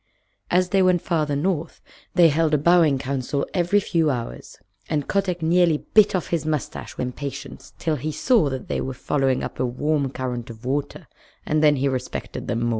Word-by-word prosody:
As 180 0 +2
they 195 +1 +3
went 180 -2 +3
farther 155 -5 0
north 165 +1 -2 0.4
they 170 -2 +7
held 155 0 +2
a - - +4
bowing 160 -2 +4
council 135 +1 -2
every 180 +2 +2
few 165 -5 +1
hours, 120 -4 -5 0.3
and 145 -2 -1
Kotick 185 -4 -1
nearly 170 -1 +3
bit 215 -3 +6
off 180 - -2
his 170 -2 0
mustache 155 -3 -4
with - - -1
impatience 135 +2 -7
till 160 -3 -1
he 150 +4 -3
saw 220 - +2
that 130 -1 -5
they - - -2
were 130 -1 -4
following 135 0 0
up - - -6
a - - +1
warm 140 +3 0
current 125 -3 -4
of 115 +1 -11
water, 140 +2 -3 0.4
and 155 0 +1
then 150 -1 +6
he 140 +1 0
respected 130 -2 -4
them 115 0 -1
more. 120 - +1
150 Hz, 190 wpm, -23 LUFS, 135-170 Hz, 0.4 s, they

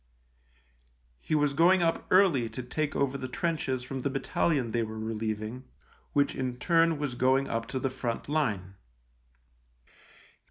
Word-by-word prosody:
He 155 - -1
was 145 -2 +2
going 175 +4 +5
up 165 0 0
early 170 - +4
to 125 +3 -6
take 150 +4 -2
over 140 0 0
the 130 - -4
trenches 135 -2 -2
from 130 +1 -5
the 140 - 0
battalion 135 -2 0
they 120 - +1
were 110 -1 -4
re 110 +1 -3
lieving, 110 +3 -4 0.5
which 140 -1 +2
in 125 -2 -3
turn 165 +3 +3
was 145 -3 -3
going 130 +2 +2
up 115 0 -2
to 130 - -4
the 135 0 -1
front 120 -3 -4
line. 105 -12 -1
130 Hz, 155 wpm, -29 LUFS, 120-150 Hz, 0.5 s, going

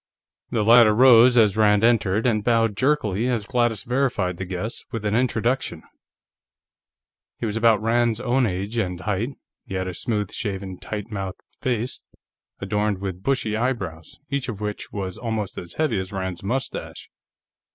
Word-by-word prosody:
The 110 - 0
latter 115 -1 +7
rose 125 0 +7
as 105 -4 +5
Rand 105 -1 +4
entered, 115 -2 +2
and 110 -4 +2
bowed 115 -2 +2
jerkily 125 -4 +1
as 120 -5 -1
Gladys 120 -4 0
verified 120 -8 0
the 95 - -4
guess 95 +5 -5
with 115 -4 -4
an 105 - 0
introduction. 120 -5 0 1.5
He - - -4
was 105 -1 -2
about 115 -2 +3
Rand's 115 0 +2
own 125 0 +1
age 100 +4 -3
and 90 -5 -2
height; 105 +4 -1 0.4
he 95 - -5
had 95 0 -2
a 90 - -4
smooth 105 +1 -2
shaven, 95 -4 -4
tight 105 +1 -6
mouthed 95 -3 -5 0.2
face, 125 -1 -2 0.6
adorned 105 +1 0
with 95 -1 -5
bushy 125 -3 0
eyebrows, 100 -10 -3
each 140 -2 -1
of 105 -4 -5
which 105 -1 -5
was 95 -3 -5
almost 110 -4 -3
as 85 - -9
heavy 150 -10 +1
as 95 0 -5
Rand's 95 -3 -4
mustache. 125 +7 -4
110 Hz, 160 wpm, -23 LUFS, 95-120 Hz, 1.5 s, latter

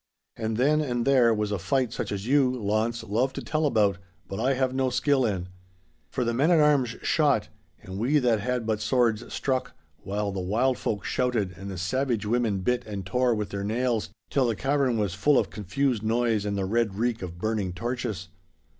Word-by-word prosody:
And 110 -1 -2
then 150 +5 +3
and 120 -5 -1
there 130 -4 +5
was 105 -1 0
a 100 - -1
fight 130 +3 0
such - - -3
as 100 0 -3
you, 135 +1 +4
Launce, 115 -1 -1
love 120 +5 0
to - - -5
tell 155 -1 0
about, 105 -7 +2 0.3
but 95 - -5
I 130 +4 +2
have 130 0 0
no 130 0 +1
skill 130 +2 +2
in. 90 -3 -3 0.6
For 125 - -1
the 115 0 0
men 140 +7 +2
at 170 -2 +5
arms 140 -6 +3
shot, - - +2 0.3
and 95 +1 -7
we 130 +7 +2
that 120 -5 +2
had 125 +2 -2
but 110 -1 -1
swords 115 -1 +1
struck, 130 -2 -1 0.3
while 100 +1 -2
the 95 - -4
wild 115 +8 +1
folk 105 -2 -2
shouted 115 -7 0
and 95 +3 -8
the 95 - -6
savage 115 +5 -1
women 110 -3 0
bit 125 +5 0
and 100 -3 -5
tore 125 +4 +1
with 105 -1 -3
their 100 0 -4
nails 115 +1 0 0.2
till 135 -3 +2
the 115 - 0
cavern 135 -1 +1
was 100 -5 0
full 125 +9 +3
of - - +1
confused 110 +4 -1
noise 110 -1 +1
and 100 -1 -1
the 95 - -1
red 110 0 0
reek 115 +2 -1
of 85 -2 -6
burning 105 -1 -1
torches. 105 -2 -4
115 Hz, 205 wpm, -26 LUFS, 105-130 Hz, 0.6 s, there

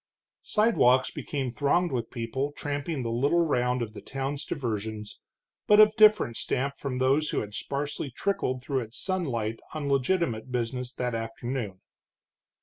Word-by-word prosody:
Sidewalks 130 - +3
became 135 -4 -3
thronged 160 +7 +1
with 120 -3 -2
people 130 +4 -3
tramping 145 0 -3
the 115 - -2
little 145 +8 +2
round 125 -4 +1
of 110 -2 -7
the - - -9
town's 135 +2 -4
diversions, 110 -5 -4 0.5
but 210 0 +7
of 215 0 +7
different 215 - +5
stamp 140 +2 -1
from 135 -3 -3
those 135 +4 +2
who - - 0
had 105 -1 -7
sparsely 140 +4 -3
trickled 130 -4 -1
through 135 -1 0
its 115 -1 -6
sunlight 120 - -1 0.2
on 150 -2 -3
legitimate 135 -4 0
business 125 +1 -2
that 125 -1 -2
afternoon. 115 -2 -4
130 Hz, 145 wpm, -28 LUFS, 115-145 Hz, 0.5 s, but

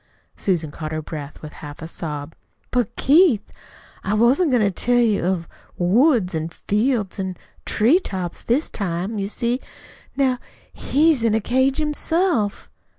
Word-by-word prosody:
Susan 170 -6 -1
caught 155 +1 -6
her 155 - -2
breath 145 -2 -7
with 150 - -7
a - - -17
half 150 +2 -8
sob. 150 -2 -5 0.4
"But, 245 -5 0
Keith, 290 - +4 0.5
I 205 +2 0
wasn't 250 +10 +4
going 245 -4 +3
to 200 - +2
tell 245 +6 +1
you 225 -6 +3
of 185 +1 +2
of - - -22 0.3
woods 210 - +3
an' 160 0 -2
fields 210 +2 -1
an' 190 -2 -3 0.3
tree 250 +12 +4
tops 185 - -5
this 260 +7 +1
time. 195 +2 -3
You 195 0 -2
see 240 +3 -1 0.6
now 260 -3 +2 0.3
he's 300 -2 +2
in 225 -2 +2
a - - +3
cage 260 +5 +1
himself." 305 - 0
215 Hz, 155 wpm, -22 LUFS, 175-260 Hz, 0.6 s, Keith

